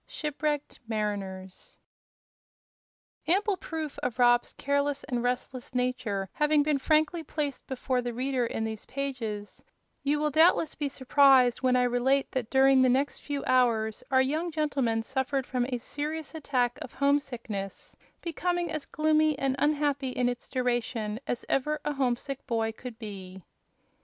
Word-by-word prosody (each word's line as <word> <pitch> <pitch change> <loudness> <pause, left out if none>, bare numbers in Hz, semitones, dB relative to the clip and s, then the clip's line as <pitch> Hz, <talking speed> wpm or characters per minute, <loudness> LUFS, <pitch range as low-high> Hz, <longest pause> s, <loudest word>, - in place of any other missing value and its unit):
Shipwrecked 300 -1 -3
Mariners 195 -4 -4 1.5
Ample 390 +3 +2
proof 320 -4 -5
of 250 -2 -3
Rob's 240 -1 +4
careless 285 0 0
and 245 -1 -2
restless 250 +1 -3
nature 250 -6 -1
having 300 -1 +3
been 295 -1 +1
frankly 310 +4 +2
placed 295 -3 -4
before 260 -1 -1
the 245 0 -3
reader 255 +1 -1
in 230 -1 -2
these 220 -1 -5
pages, 240 -7 -4 0.4
you 285 +1 +1
will 300 0 +1
doubtless 320 +1 +4
be 290 -2 -2
surprised 265 -2 +4
when 255 -1 +3
I 250 - +4
relate 250 +3 +2
that 250 -4 -2
during 265 0 +5
the 255 - +5
next 270 +3 +1
few 285 -1 -4
hours 230 -4 +2
our 260 -1 +4
young 310 +6 -1
gentleman 275 -8 0
suffered 265 +2 -1
from 250 -1 -1
a 250 - -1
severe 290 +5 -4 0.2
attack 255 -6 0
of - - -8
homesickness, 245 -8 -2 0.3
becoming 350 +1 -1
as 310 -2 -4
gloomy 310 -1 +2
and 270 -1 0
unhappy 290 -2 +1
in 250 -1 0
its 245 0 -4
duration 240 -4 -1
as 240 - -3
ever 300 +3 0
a 295 - 0
homesick 270 0 -2
boy 225 -2 0
could 235 +1 -9
be. 190 -4 -8
260 Hz, 145 wpm, -28 LUFS, 240-290 Hz, 1.5 s, during